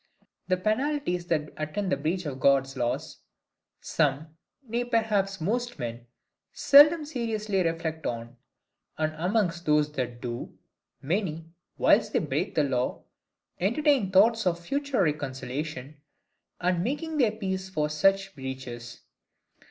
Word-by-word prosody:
The 185 - +2
penalties 215 -3 -1
that 150 -3 -1
attend 180 +6 -3
the - - +4
breach 165 +6 -2
of 135 -3 -5
God's 135 0 +3
laws 120 -2 -2 0.6
some, 150 +1 0 0.3
nay 235 +2 -1
perhaps 215 -5 0
most 240 +8 -2
men, 120 0 -6 0.4
seldom 300 +3 +7
seriously 220 -8 -1
reflect 165 -1 -2
on: 115 +1 -5 0.6
and 155 0 0
amongst 175 0 -1
those 150 0 +3
that 125 -4 -4
do, 120 -1 -6 0.5
many, 165 0 -1 0.3
whilst - - +3
they - - +3
break - - -2
the 150 - +3
law, 130 -3 -1 0.6
entertain 240 - +2
thoughts 215 +2 +4
of 170 -1 +1
future 275 +4 0
reconciliation, 145 -1 -4 0.6
and 180 -1 +1
making 305 - -2
their 230 -5 +3
peace 190 -3 -3
for 155 -5 0
such 195 +6 +2
breaches. 130 -4 -7
170 Hz, 125 wpm, -27 LUFS, 145-215 Hz, 0.6 s, seldom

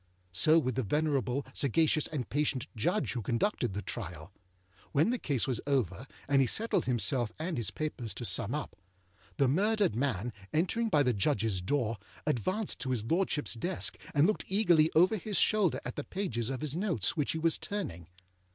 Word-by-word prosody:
So 155 - +5
with 130 -6 +1
the 130 - 0
venerable, 140 +1 0
sagacious, 155 +3 +2
and 140 -6 -4
patient 145 -3 0
Judge 175 - 0
who 120 - -3
conducted 120 - -1
the 105 - -3
trial. 95 -3 -7 0.6
When 155 +11 +3
the 250 - -1
case 140 -6 +1
was 125 -4 -1
over, 130 - 0 0.2
and 140 -1 +4
he 130 - +3
settled 225 - +1
himself 120 -1 +1
and 165 +2 -3
his 115 -6 -1
papers 140 -7 -4
to 120 - -5
sum 115 +2 +1
up, 150 - -5 0.6
the 140 - +3
murdered 200 - +2
man, 120 -3 -1 0.2
entering 190 +9 +1
by 150 -7 +4
the 125 -2 +2
Judgesâ 105 -4 0
door, 115 -5 0 0.3
advanced 185 - -1
to 135 - -3
his 125 -5 -1
Lordshipâs 150 -3 0
desk, 180 +6 -1 0.2
and 145 +2 +5
looked 215 - 0
eagerly 175 -6 +4
over 185 +7 +5
his 205 +1 -3
shoulder 210 -6 +3
at - - -5
the 145 - -3
pages 125 - -3
of 135 0 -4
his 150 -1 -3
notes 175 - +1
which 150 -4 0
he - - -2
was 165 0 +1
turning. 90 - -5
140 Hz, 180 wpm, -31 LUFS, 120-170 Hz, 0.6 s, So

